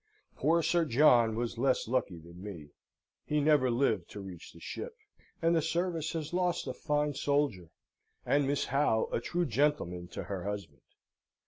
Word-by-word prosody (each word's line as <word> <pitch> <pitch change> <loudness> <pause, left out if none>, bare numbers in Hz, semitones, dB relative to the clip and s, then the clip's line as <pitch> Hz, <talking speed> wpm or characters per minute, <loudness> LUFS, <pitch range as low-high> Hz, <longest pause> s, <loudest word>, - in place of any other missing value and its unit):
Poor 165 +4 +2
Sir 170 +1 +3
John 120 -5 +5
was 115 0 -3
less 130 -2 +2
lucky 120 -7 -1
than 85 +2 -13
me. 85 -8 -8 0.5
He 150 - 0
never 145 -3 +4
lived 115 -7 +1
to - - -8
reach 95 -4 -9
the - - -15
ship, - - -6 0.5
and 165 +1 +4
the 165 - +3
service 165 0 -1
has 160 -1 -4
lost 180 -1 0
a 130 - -3
fine 150 +1 0
soldier, 140 - 0 0.6
and 145 -1 +2
Miss 140 0 0
Howe 135 -5 +1
a - - 0
true 175 +7 -1
gentleman 115 - 0
to 90 - -6
her 95 0 -5
husband. 100 -9 -5
130 Hz, 165 wpm, -31 LUFS, 100-150 Hz, 0.6 s, John